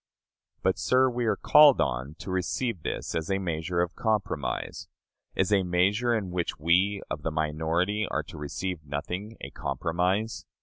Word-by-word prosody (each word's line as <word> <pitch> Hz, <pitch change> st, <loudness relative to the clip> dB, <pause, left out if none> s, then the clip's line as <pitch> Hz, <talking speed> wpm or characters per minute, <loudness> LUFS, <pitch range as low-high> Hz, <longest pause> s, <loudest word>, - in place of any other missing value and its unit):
But, -, -, +1 dB
sir, 130 Hz, 0 st, +3 dB
we 120 Hz, 0 st, -1 dB
are 105 Hz, -, +3 dB
called 150 Hz, +5 st, +7 dB
on 65 Hz, +3 st, -1 dB
to 95 Hz, -, -7 dB
receive 95 Hz, +2 st, -1 dB
this -, -, -4 dB
as 80 Hz, -1 st, -2 dB
a 95 Hz, -, +2 dB
measure 85 Hz, -1 st, -1 dB
of 90 Hz, 0 st, -1 dB
compromise! 110 Hz, -3 st, -2 dB, 0.5 s
Is 105 Hz, -, +2 dB
a 100 Hz, -, +4 dB
measure 100 Hz, +7 st, +2 dB
in 100 Hz, -5 st, -2 dB
which 90 Hz, -1 st, -2 dB
we 95 Hz, +6 st, +2 dB
of 75 Hz, -, -3 dB
the 80 Hz, -, -1 dB
minority 80 Hz, +7 st, 0 dB
are 80 Hz, -, -1 dB
to 85 Hz, +2 st, -11 dB
receive 80 Hz, +3 st, -4 dB
nothing 90 Hz, +10 st, -5 dB
a -, -, -7 dB
compromise? 90 Hz, -, -1 dB
90 Hz, 165 wpm, -27 LUFS, 80-105 Hz, 0.5 s, called